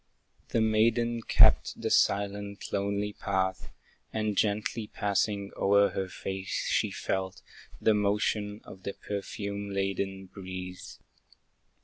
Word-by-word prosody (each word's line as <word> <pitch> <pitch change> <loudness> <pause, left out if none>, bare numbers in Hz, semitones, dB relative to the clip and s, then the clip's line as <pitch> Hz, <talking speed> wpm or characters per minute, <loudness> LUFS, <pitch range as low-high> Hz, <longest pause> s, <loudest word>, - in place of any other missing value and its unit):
The 115 - +2
maiden 115 +2 +2
kept - - +5
the - - -2
silent, 100 0 +1
lonely 100 +1 0
path, 95 -2 -1 0.4
And 110 -1 -1
gently 105 +2 0
passing 100 -1 0
o'er 100 +1 +4
her 95 -1 -2
face, 95 0 -3
she - - +2
felt 95 0 -3 0.4
The 110 - +4
motion 105 0 0
of 95 - -12
the 100 - -4
perfume 100 0 -4
laden 95 0 -2
breeze. 95 -1 -8
100 Hz, 110 wpm, -29 LUFS, 95-105 Hz, 0.4 s, kept